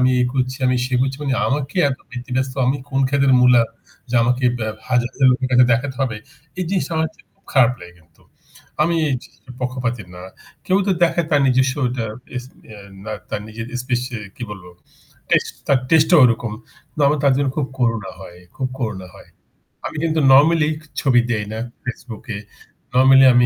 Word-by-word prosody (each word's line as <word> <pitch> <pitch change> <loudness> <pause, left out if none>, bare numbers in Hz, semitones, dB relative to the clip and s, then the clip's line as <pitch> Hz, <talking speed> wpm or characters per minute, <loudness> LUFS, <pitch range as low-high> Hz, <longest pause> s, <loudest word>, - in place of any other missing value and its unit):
আমি 125 0 +4
এ - - +4
করছি 130 -1 -1
আমি 125 0 +2
সে 130 - -3
করছি 135 +1 0
মানে 135 -3 0
আমাকে 145 +3 -2
এত 130 - -4
ব্যাতিব্যস্ত 130 +1 -3
আমি 135 +3 +2
কোন 135 -1 0
খেতের 140 -1 +3
মূলা 125 -1 +6 0.5
যে 125 - -3
আমাকে 125 +2 +1
বে 110 - -2 0.2
হাজার, 125 -1 +2
হাজার 135 -1 +3
লোকের 130 +1 0
কাছে 125 0 +6
দেখাতে 130 +3 -1
হবে। 120 -5 -2 0.4
এই - - 0
জিনিসটা 185 -3 -1
আমার 160 0 +1
কাছে - - -23
খুব - - -40
খারাপ 125 -3 +5
লাগে 90 0 -11
কিন্তু। 80 -1 -27 0.6
আমি 170 +2 +1
এই 135 - +1
জিনিসটার 125 - -15
পক্ষপাতি 125 -2 -2
না। 90 - -10 0.4
কেউ 190 +1 +3
তো 200 - +2
দেখায় 170 -1 +2
তার 145 -2 +4
নিজস্বটা 130 +1 +2
তার 115 -2 -2 0.3
স - - -14 0.3
এ - - -11 0.3
বা 110 - -5 0.2
তার 105 - -2
নিজের 115 +1 -7 0.2
স্পেশাল 125 -2 -3
কি 120 - -8
বলব 95 -3 -9 0.7
টেস্ট - - +2
তার 140 - +4
টেস্টে 160 +2 +5
ও - - +7
ঐরকম। 115 -2 +1 0.4
তো - - -4
আমার 150 +1 +2
তার 140 - +5
জন্য 140 -1 +1
খুব 145 - 0
করুণা 115 -5 0
হয়। 85 - -11 0.2
খুব 130 -1 -2
করুণা 105 -7 -4
হয়। - - -15 0.6
আমি - - -5
কিন্তু 160 -1 +1
নরমালি 155 +3 +5 0.3
ছবি 125 -3 +4
দেই 105 -2 -1
না 110 - -4 0.2
Facebook 120 -2 -7
এ। - - -3 0.6
নরমালি 135 +1 +6
আমি 120 0 +5
130 Hz, 190 wpm, -20 LUFS, 120-140 Hz, 0.7 s, ও